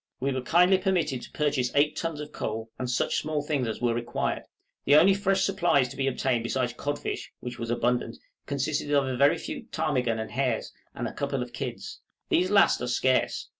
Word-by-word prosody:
We 135 +2 0
were 130 -1 -2
kindly 180 +7 +4
permitted 175 -9 0
to - - -11
purchase 145 -5 0
eight 150 +1 +3
tons 165 -3 -3
of 150 0 -7
coals, 110 -3 -4
and 125 -1 -3
such 125 - 0
small 155 -1 -1
things 145 -5 -1
as 110 - -4
were 120 -1 +2
required; 120 +1 -2 0.4
the 145 - +5
only 185 +6 +7
fresh 195 0 +1
supplies 175 -9 +2
to 135 - -9
be 135 0 -1
obtained 130 -2 0
besides 120 0 -1
codfish, 145 +4 -4
which 125 0 -7
was 115 -1 -4
abundant, 120 0 0 0.3
consisted 145 +1 -1
of 140 -2 +3
a 130 -1 -2
very 140 +3 +4
few - - -6
ptarmigan 130 -8 0
and 110 0 -5
hares, 130 0 -1 0.2
and - - -3
a - - -7
couple 140 -2 -2
of 120 0 -11
kids; 120 0 -6 0.3
these 180 +2 +2
last 200 -9 +4
are 125 - -2
scarce. 130 +1 +1
135 Hz, 205 wpm, -27 LUFS, 125-155 Hz, 0.4 s, only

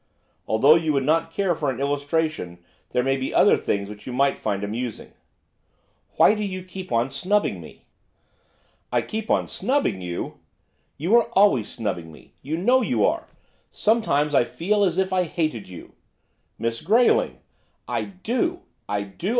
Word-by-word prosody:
Although 140 +9 +5
you 160 -2 0
would 135 -1 +1
not 165 +2 +1
care 190 +1 +1
for 155 -3 -2
an 130 -1 -3
illustration, 145 - -1 0.3
there 125 - 0
may 135 +1 +1
be 130 - -4
other - - +6
things 100 0 -2
which 105 0 -11
you - - -4
might 140 +2 +2
find 100 -2 -3
amusing.' 115 +2 -5 1.0
'Why - - +6
do 210 -1 -3
you 185 -2 -4
keep 185 0 -9
on 120 +3 +1
snubbing 205 +3 0
me?' - - -14 1.1
'I - - +1
keep 220 0 -5
on - - +2
snubbing 205 - 0
you!' 90 -1 -5 0.6
'You 170 +10 +2
are 235 0 +2
always 165 - +4
snubbing 85 -7 -4
me, 75 - -17
you 155 +4 -3
know 245 +9 +3
you - - +1
are. - - -1 0.4
Some 225 +2 +2
times 145 -6 +1
I 135 - +5
feel 205 - 0
as 180 -3 +1
if 190 0 0
I 185 - +3
hated 155 - -2
you.' 90 - -11 0.6
'Miss 115 0 -2
Grayling!' 225 +9 +3 0.5
'I - - -2 0.2
do! 340 +10 0 0.3
I 100 0 -1
do! 100 - -5
155 Hz, 165 wpm, -24 LUFS, 115-195 Hz, 1.1 s, other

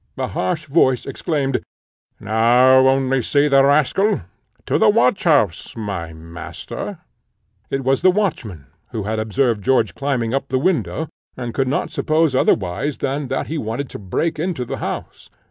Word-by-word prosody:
A - - -1
harsh 90 - -2
voice 135 -5 +2
exclaimed 140 -1 -1 0.6
"Now 125 +4 +4
only 135 0 +2
see 145 +4 +2
the 135 -1 +5
rascal! 150 +9 +2 0.4
To - - +1
the 220 - +5
watch 210 -2 +2
house, 125 - +1
my 100 -7 -4
master!" 85 +2 -8 0.7
It 135 0 -2
was 135 +1 +1
the 185 - +6
watchman 150 - -2 0.3
who 110 -3 -3
had 110 +2 -2
observed 110 0 0
George 130 +4 +2
climbing 125 -5 -1
up 135 0 -1
the 130 - 0
window, 160 +1 0 0.3
and 120 -2 -5
could 135 -1 0
not 140 - -1
suppose 155 -2 +1
otherwise 130 +3 +1
than 140 +1 -2
that 130 +1 -2
he 160 0 -3
wanted 115 +4 -4
to - - -7
break 155 - -2
into 165 -6 -2
the - - -5
house. - - -6
135 Hz, 160 wpm, -20 LUFS, 115-150 Hz, 0.7 s, the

